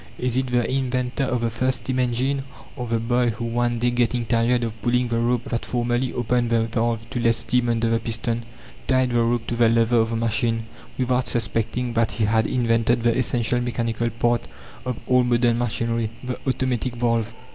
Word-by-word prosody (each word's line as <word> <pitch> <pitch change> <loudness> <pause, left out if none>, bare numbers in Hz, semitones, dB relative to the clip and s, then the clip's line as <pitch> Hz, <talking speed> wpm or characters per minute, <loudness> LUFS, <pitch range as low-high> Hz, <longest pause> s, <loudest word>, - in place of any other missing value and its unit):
Is 125 -1 0
it 130 0 +1
the 120 -1 +1
inventor 130 0 -1
of 125 -2 -1
the 115 -1 0
first 130 +3 0
steam 130 -1 -1
engine, 130 +3 0 0.3
or 125 - -5
the 115 0 +1
boy, 120 +2 +1
who, 115 +1 -4
one 120 +1 0
day 120 +1 +1
getting 120 0 0
tired 120 +1 +2
of 115 -2 -5
pulling 125 +3 +1
the 115 0 0
rope 120 0 +1
that 115 - -3
formerly 120 +1 -1
opened 120 0 0
the 115 -1 +3
valve 115 0 -1
to 120 - -2
let 115 -1 +3
steam 120 +1 0
under 115 0 +1
the 115 0 +2
piston, 115 0 -2 0.4
tied 130 -1 +2
the 120 0 +2
rope 115 0 +1
to 120 - -3
the 115 -1 +4
lever 115 +1 +3
of 115 0 +3
the 115 - -2
machine, 115 0 0 0.3
without 125 0 +1
suspecting 115 +2 -1
that 115 -1 +1
he 110 - +1
had 110 +1 +2
invented 115 -1 +1
the 120 -1 +3
essential 120 -1 0
mechanical 120 -1 -1
part 120 +1 +1 0.5
of 125 -3 -2
all 125 0 +4
modern 120 -1 +2
machinery 115 -1 -1
the 125 0 -4
automatic 130 -1 -1
valve? 115 -2 0
120 Hz, 200 wpm, -23 LUFS, 115-125 Hz, 0.5 s, the